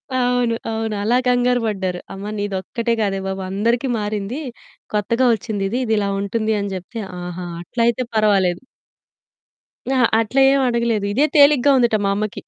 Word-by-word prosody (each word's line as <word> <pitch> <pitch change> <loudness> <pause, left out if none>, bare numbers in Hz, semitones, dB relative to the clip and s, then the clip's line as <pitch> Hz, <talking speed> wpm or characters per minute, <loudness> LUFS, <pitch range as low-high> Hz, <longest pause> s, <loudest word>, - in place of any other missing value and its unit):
అవును. 245 -2 +1 0.2
అవును. 220 -1 -2
అలా 235 +3 +2
కంగారు 245 0 +2
పడ్డారు. 190 -4 -2
"అమ్మ, 195 +2 -6
నీదొక్కటే 205 +4 -2
కాదే 195 -2 0
బాబు 190 0 -3
అందరికి 235 +7 0
మారింది. 210 +5 -3 0.5
కొత్తగా 230 +5 +1
వచ్చిందిది, 210 0 -2
ఇది 220 - 0
ఇలా 200 -1 0
ఉంటుంది" 215 +2 -1
అని 200 -1 -3
చెప్తే, 185 +5 -7 0.2
"ఆహా! 180 0 -6 0.2
అట్లయితే 235 +6 0
పర్వాలేదు." 195 -5 +2 1.3
అహా! 255 -2 +4
అట్లా 230 +5 +1
ఏమి 275 -1 +2
అడగలేదు. 235 -3 0
ఇదే 280 +6 +3
తేలికగా 285 -1 +6
ఉందట 240 -3 +3
మా 195 - +2
అమ్మకి. 210 +1 -3
220 Hz, 145 wpm, -20 LUFS, 200-245 Hz, 1.3 s, తేలికగా